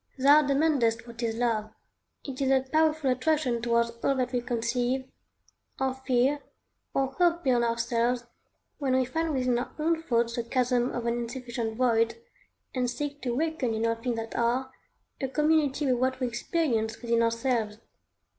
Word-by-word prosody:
Thou 285 +3 +7
demandest 275 -6 +2
what 235 0 -9
is 225 -1 -1
love? 225 -3 0 0.6
It 270 -1 -6
is 265 - +2
that 265 0 +2
powerful 315 -3 +3
attraction 255 -2 +1
towards 235 0 +2
all 275 - +2
that 250 -1 -1
we 245 -1 0
conceive, 245 +2 -1 0.7
or 265 -1 +1
fear, 265 +2 +1 0.5
or 270 -1 0
hope 345 -1 +3
beyond 245 -3 +3
ourselves, 235 +1 0 0.5
when 265 -3 +1
we 260 0 +3
find 325 +5 -1
within 250 -3 +1
our 250 - -5
own 325 +1 +1
thoughts 235 -5 0
the 235 - 0
chasm 250 0 +1
of 240 - -4
an 235 - +1
insufficient 235 -2 -4
void, 230 -2 +2 0.6
and 250 -2 0
seek 285 +4 -4
to 245 -2 -1
awaken 290 -4 -1
in 220 +1 0
all 230 - +2
things 230 +1 -3
that 225 0 -5
are, 250 +3 0 0.5
a 270 - 0
community 300 0 +2
with 255 -3 +2
what 260 0 +1
we 255 - 0
experience 235 -3 -1
within 235 -1 +2
ourselves. 230 -2 0
250 Hz, 165 wpm, -28 LUFS, 235-275 Hz, 0.7 s, Thou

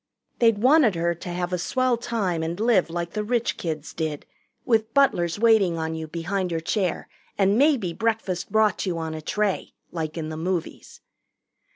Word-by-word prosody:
They'd 230 -3 +4
wanted 255 - +4
her 170 +1 +1
to 170 +1 -9
have 175 +1 -3
a 180 - 0
swell 255 +7 +1
time 210 -8 -2
and 165 +3 -3
live 220 -6 +3
like 170 0 -4
the 210 - -2
rich 235 +1 0
kids 155 -3 -5
did, 155 -3 -3 0.4
with 225 -1 +1
butlers 175 -12 +3
waiting 210 -6 +4
on 160 0 -2
you 160 0 -5
behind 180 +4 -2
your 165 -1 -1
chair 180 +2 -1 0.3
and 195 0 +3
maybe 250 - +3
breakfast 220 -4 -2
brought 215 -2 +2
you 175 -2 -1
on 160 -1 -4
a 155 - -6
tray, 205 +4 -2 0.2
like 160 -1 -4
in 155 -1 -3
the 155 - -5
movies. 175 0 -4
185 Hz, 180 wpm, -24 LUFS, 165-220 Hz, 0.4 s, They'd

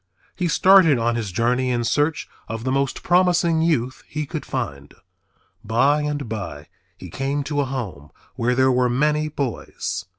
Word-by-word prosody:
He 180 - -1
started 180 -3 +5
on 120 0 +1
his 110 -5 -3
journey 125 +6 +1
in 120 -1 0
search 145 +6 0 0.2
of 115 +1 -5
the 130 - -1
most 135 0 -1
promising 175 -2 +3
youth 130 -6 0
he 150 -1 -4
could - - -6
find. 70 0 -5 0.7
By 135 +7 +2
and 145 -3 -3
by 85 -10 -6 0.3
he - - -10
came 140 +2 -2
to 145 0 -1
a - - -1
home 110 - -6 0.3
where 125 0 0
there 130 +1 +4
were 125 0 +2
many 150 +4 +1
boys. 105 - -4
130 Hz, 165 wpm, -22 LUFS, 115-150 Hz, 0.7 s, started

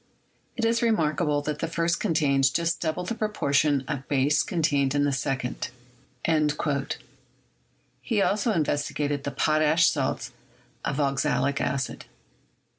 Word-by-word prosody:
It 230 - 0
is 230 0 +2
remarkable 155 -9 +1
that 150 0 -3
the 165 - -1
first 170 +1 0
contains 140 -8 +2
just 170 +4 0
double 165 +2 -1
the 185 - -3
proportion 145 - +1
of 140 -3 -4
base 145 +2 +2
contained 145 -5 +1
in 145 - +3
the 145 - +2
second." 130 -1 -2 2.3
He 225 -4 0
also 205 +3 +2
investigated 145 -4 -1
the - - 0
potash 155 +3 +3
salts - - -2 0.5
of 140 - -2
oxalic 140 0 +1
acid. 130 -1 -2
150 Hz, 120 wpm, -26 LUFS, 140-170 Hz, 2.3 s, in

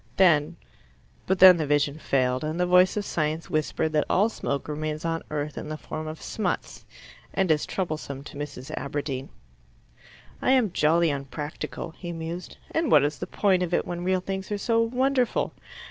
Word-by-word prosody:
Then 165 -3 +4 0.7
but 190 - +2
then 185 -1 +9
the 155 -3 -1
vision 145 +1 +1
failed, 130 -2 +1
and 155 +3 -3
the 180 - +3
voice 180 +2 +5
of 205 - -1
science 155 -1 -2
whispered 155 +1 0
that 150 -1 +1
all 205 +4 +3
smoke 140 -10 -3
remains 155 +1 -3
on 165 0 -1
earth 150 -1 -3
in - - -7
the 155 - -4
form 155 0 -6
of 155 0 -6
smuts, 195 -5 -3 0.5
and 190 -3 +2
is 150 -1 +1
troublesome 155 -6 -4
to - - -11
Mrs. 140 -2 -6
Aberdeen. 140 -2 -4 1.1
"I 260 - +3
am 245 -7 +3
jolly 165 0 +3
unpractical," 145 +4 -5
he 175 -2 -5
mused. 165 +2 -6
"And 325 -1 0
what - - +7
is 145 +1 -1
the - - -4
point 190 -3 +2
of 180 -1 0
it - - 0
when 175 0 -4
real 185 0 +1
things 190 +1 -5
are 205 - 0
so 230 +3 +2
wonderful? 250 +1 +1
165 Hz, 180 wpm, -26 LUFS, 150-185 Hz, 1.1 s, then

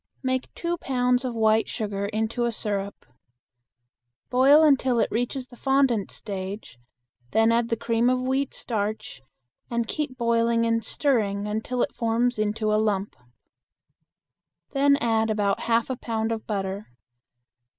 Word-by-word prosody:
Make 260 0 -1
two 345 0 -2
pounds 250 -1 +1
of 250 -2 -3
white 220 0 +3
sugar 200 -2 -3
into 220 +3 -1
a 235 - 0
syrup. 200 -2 -4 1.3
Boil 275 +5 +6
until 265 -4 +3
it - - +1
reaches 245 +3 -2
the 250 - -16
fondant 265 -5 +1
stage, 195 - -7 0.5
then 225 +1 +4
add 230 0 +1
the 230 - +1
cream 230 +1 +1
of 255 0 +2
wheat 265 +2 -1
starch, 215 - -4 0.5
and 235 -1 -1
keep 275 -2 -3
boiling 230 -1 +2
and 230 0 +1
stirring 210 -8 0
until 220 +4 -1
it - - -3
forms 235 0 0
into 215 0 0
a 215 - +3
lump. 205 -2 -1 1.6
Then 280 0 +4
add 225 -3 +1
about 205 -2 +1
half 230 0 +3
a - - -1
pound 225 -1 -2
of 225 -1 -4
butter. 195 -1 -3
230 Hz, 140 wpm, -25 LUFS, 215-250 Hz, 1.6 s, Boil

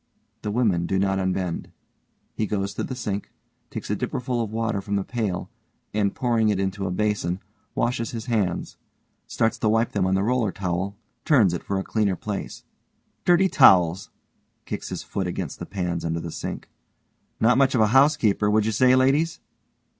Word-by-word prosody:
(_the 105 - -3
women 100 -7 +1
do 95 - 0
not 95 0 +1
unbend. 95 -2 -2 0.6
He 110 - -1
goes 100 -1 -2
to - - -3
the 130 - -4
sink, 105 -5 -4 0.4
takes - - -5
a - - +2
dipperful 125 -1 -2
of 110 - -5
water 110 -2 -1
from 100 +1 -3
the 100 - 0
pail 105 -7 -3 0.4
and 100 -1 0
pouring 115 -3 +2
it 100 -2 +1
into 95 0 -2
a - - -2
basin, 95 -2 -1 0.4
washes 115 -1 0
his 115 -2 -6
hands. 105 -8 -1 0.5
Starts 115 +1 0
to 110 - +2
wipe 110 +1 +2
them 95 -3 +1
on 95 - +2
the 95 - +1
roller 115 -2 +1
towel, 95 +1 -3 0.3
turns 115 - +4
it 85 - -3
for 100 - -2
a 95 - -1
cleaner 105 -3 0
place_) 105 -2 -5 0.6
Dirty 180 +2 +5
towels! 90 - +5 0.6
(kicks - - -5
his - - -5
foot 95 -2 -3
against 90 - -4
the - - -6
pans 90 -3 -3
under 85 0 -1
the 85 0 -6
sink) - - -6 0.7
Not 125 +3 +4
much 135 -2 +3
of 115 - +3
a 105 - +4
housekeeper, 135 -7 +4
would 105 0 +3
you 110 - +1
say, 130 +3 +4
ladies? 145 +6 +2
105 Hz, 185 wpm, -24 LUFS, 95-115 Hz, 0.7 s, Dirty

